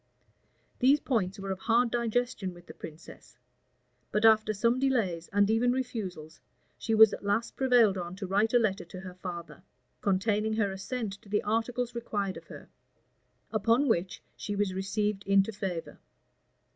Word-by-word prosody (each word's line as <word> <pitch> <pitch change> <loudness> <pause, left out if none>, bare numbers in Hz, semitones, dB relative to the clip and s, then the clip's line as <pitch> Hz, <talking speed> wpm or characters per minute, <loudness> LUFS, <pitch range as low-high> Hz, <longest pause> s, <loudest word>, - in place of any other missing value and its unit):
These 275 +4 +5
points 205 -10 -1
were 195 -1 -5
of 190 - -4
hard 235 +2 +2
digestion 235 -5 -1
with 175 0 -15
the - - -11
princess; 160 +1 -12 0.7
but 210 +1 +2
after 220 -1 +5
some 230 +4 +1
delays, 215 -11 0
and 205 0 +3
even 225 +3 +2
refusals, 195 -11 -4 0.4
she 225 - 0
was 220 -1 +8
at - - -6
last 205 +3 -1
prevailed 240 -7 +4
on 175 +1 -5
to 195 +1 -5
write 205 +4 +1
a - - +9
letter 205 -5 +1
to 180 +2 -10
her 185 -1 -8
father,[] 175 -4 -8 0.4
containing 210 +2 +1
her 205 -3 +1
assent 195 +1 -5
to 200 - -18
the 210 +1 +1
articles 235 +3 -1
required 205 -5 -3
of - - -12
her; - - -11 0.8
upon 230 +6 +2
which 185 -5 -1
she 205 - -4
was 200 -2 0
received 200 +1 -1
into 195 +2 +4
favor. 190 -5 -5
205 Hz, 160 wpm, -29 LUFS, 190-230 Hz, 0.8 s, a